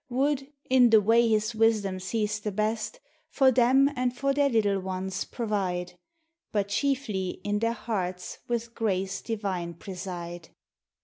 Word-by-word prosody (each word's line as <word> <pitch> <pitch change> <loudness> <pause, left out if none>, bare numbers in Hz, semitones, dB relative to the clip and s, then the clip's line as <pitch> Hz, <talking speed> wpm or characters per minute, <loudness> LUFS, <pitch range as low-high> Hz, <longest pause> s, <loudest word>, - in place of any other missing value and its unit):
Would, 275 +2 0 0.2
in 255 -2 +6
the 220 -1 +7
way 230 +3 +4
his 215 +1 +1
wisdom 215 -4 +2
sees 215 +2 -1
the 210 0 -3
best, 215 +2 -2 0.3
For 265 -2 +4
them 260 +3 +5
and 250 -1 -1
for 275 0 +1
their 285 0 +3
little 205 -5 +2
ones 190 0 -3
provide; 185 -6 -2 0.6
But, 200 -2 0
chiefly, 220 -7 -1
in 205 0 0
their 230 +1 +1
hearts 185 -5 -4
with 235 -1 -2
grace 195 -4 -1
divine 190 -6 -3
pre 190 +4 -8
side. 175 -2 -6
215 Hz, 145 wpm, -27 LUFS, 190-235 Hz, 0.6 s, the